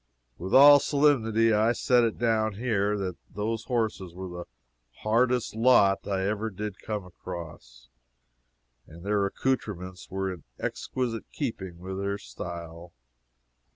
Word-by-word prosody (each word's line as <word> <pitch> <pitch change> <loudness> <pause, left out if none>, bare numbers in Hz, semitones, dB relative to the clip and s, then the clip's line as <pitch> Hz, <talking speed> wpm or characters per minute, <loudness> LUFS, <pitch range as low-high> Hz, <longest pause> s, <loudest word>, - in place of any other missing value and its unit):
With 95 +2 -5
all 145 +1 +10
solemnity 115 -7 +3
I 110 +3 +3
set 125 0 +3
it 115 -2 0
down 110 -2 +1
here, 105 -3 0
that 95 -3 -3
those 110 +2 -3
horses 110 -8 -2
were 95 +1 -6
the 90 0 -7 0.6
hardest 120 +2 +1
lot 110 -4 +4
I 95 -2 -1
ever 105 +2 -1
did 105 +1 -6
come 105 -3 -4
across, 80 -10 -10 1.0
and 85 +3 -13
their 100 0 +1
accoutrements 95 -6 -3
were 95 0 -2
in 85 - -12
exquisite 120 -3 -3
keeping 95 - -4
with 95 +2 -6
their 100 0 -1
style. 85 +4 -8
105 Hz, 130 wpm, -27 LUFS, 90-115 Hz, 1.0 s, all